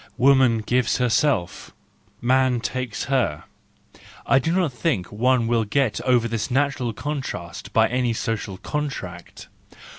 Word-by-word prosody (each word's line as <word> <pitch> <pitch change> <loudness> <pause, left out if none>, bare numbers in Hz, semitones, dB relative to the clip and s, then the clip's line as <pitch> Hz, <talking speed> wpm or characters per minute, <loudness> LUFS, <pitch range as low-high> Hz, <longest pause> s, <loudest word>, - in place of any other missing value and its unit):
Woman 130 -4 +4
gives 125 -1 +1
herself, 125 -5 0 0.5
man 130 0 +2
takes 125 -1 -3
her. 110 - 0 0.4
— - - -25 0.3
I 135 - +4
do 160 +5 -1
not 175 -6 +1
think 120 - -1
one 120 +3 +2
will 115 -1 +1
get 115 +1 0
over 125 -2 +2
this 115 +1 -3
natural 135 -2 0
contrast 105 - -5
by 110 +1 +4
any 125 0 0
social 110 -4 -3
contract 95 - -6
125 Hz, 130 wpm, -23 LUFS, 110-135 Hz, 0.5 s, Woman